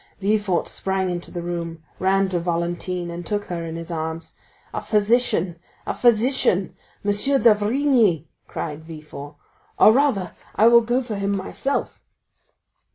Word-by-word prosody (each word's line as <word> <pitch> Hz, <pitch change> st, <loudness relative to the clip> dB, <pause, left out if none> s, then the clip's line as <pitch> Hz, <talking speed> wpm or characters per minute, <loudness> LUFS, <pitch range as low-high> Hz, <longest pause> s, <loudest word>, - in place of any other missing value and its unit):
Villefort 205 Hz, -3 st, +1 dB
sprang 190 Hz, -1 st, -1 dB
into 175 Hz, 0 st, -5 dB
the 175 Hz, -1 st, -5 dB
room, 170 Hz, -2 st, -5 dB, 0.2 s
ran 195 Hz, +1 st, +2 dB
to 180 Hz, -2 st, 0 dB
Valentine, 175 Hz, +1 st, -2 dB
and 170 Hz, +1 st, -6 dB
took 205 Hz, +3 st, -2 dB
her 170 Hz, -2 st, -3 dB
in 165 Hz, 0 st, -5 dB
his 165 Hz, +1 st, -7 dB
arms. 160 Hz, 0 st, -4 dB, 0.4 s
"A -, -, -2 dB
physician, 210 Hz, -5 st, +1 dB, 0.3 s
a -, -, -2 dB
physician,—M. 220 Hz, -4 st, +1 dB, 0.3 s
d'Avrigny!" 220 Hz, -, +3 dB, 0.2 s
cried 155 Hz, -1 st, -5 dB
Villefort; 150 Hz, -2 st, -10 dB, 0.4 s
"or -, -, +8 dB
rather 225 Hz, -9 st, +1 dB, 0.2 s
I 225 Hz, +2 st, +6 dB
will 235 Hz, 0 st, +7 dB
go 240 Hz, +3 st, 0 dB
for 225 Hz, -4 st, -4 dB
him 200 Hz, 0 st, 0 dB
myself." 270 Hz, +8 st, -3 dB
190 Hz, 135 wpm, -23 LUFS, 170-215 Hz, 0.4 s, or